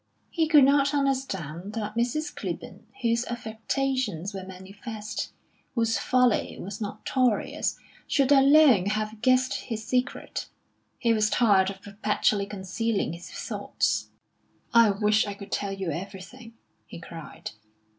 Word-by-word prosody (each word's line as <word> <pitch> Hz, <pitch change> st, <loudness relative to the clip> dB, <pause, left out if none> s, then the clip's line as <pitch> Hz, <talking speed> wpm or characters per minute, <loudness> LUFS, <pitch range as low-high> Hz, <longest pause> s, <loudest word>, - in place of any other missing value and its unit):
He 325 Hz, -2 st, +1 dB
could 300 Hz, -3 st, +7 dB
not 280 Hz, +1 st, +4 dB
understand 205 Hz, -, -2 dB
that 215 Hz, -2 st, -3 dB
Mrs. 245 Hz, +7 st, -1 dB
Clibborn, -, -, -6 dB, 0.2 s
whose 235 Hz, 0 st, +2 dB
affectations 225 Hz, -4 st, -2 dB
were 190 Hz, -1 st, -5 dB
manifest, 205 Hz, +3 st, -7 dB, 0.4 s
whose 230 Hz, -2 st, +1 dB
folly 250 Hz, -3 st, +2 dB
was 200 Hz, +3 st, -7 dB
notorious, 220 Hz, +3 st, 0 dB, 0.3 s
should 275 Hz, -2 st, +2 dB
alone 275 Hz, -7 st, +6 dB
have 215 Hz, +1 st, -2 dB
guessed 255 Hz, +1 st, +3 dB
his 220 Hz, -2 st, -5 dB
secret. 250 Hz, +1 st, -2 dB, 0.5 s
He 230 Hz, -1 st, +2 dB
was 215 Hz, -1 st, +2 dB
tired 200 Hz, -6 st, +4 dB
of 195 Hz, 0 st, -9 dB
perpetually 205 Hz, 0 st, 0 dB
concealing 200 Hz, 0 st, -2 dB
his 170 Hz, +1 st, -9 dB
thoughts. -, -, -2 dB, 0.6 s
"I 230 Hz, -2 st, +7 dB
wish 210 Hz, +1 st, +2 dB
I 200 Hz, -, -4 dB
could 200 Hz, 0 st, -11 dB
tell 200 Hz, -1 st, -1 dB
you 195 Hz, -3 st, -3 dB
everything!" 195 Hz, -, -8 dB, 0.3 s
he -, -, -9 dB
cried. 165 Hz, -1 st, -9 dB
220 Hz, 125 wpm, -27 LUFS, 200-255 Hz, 0.6 s, could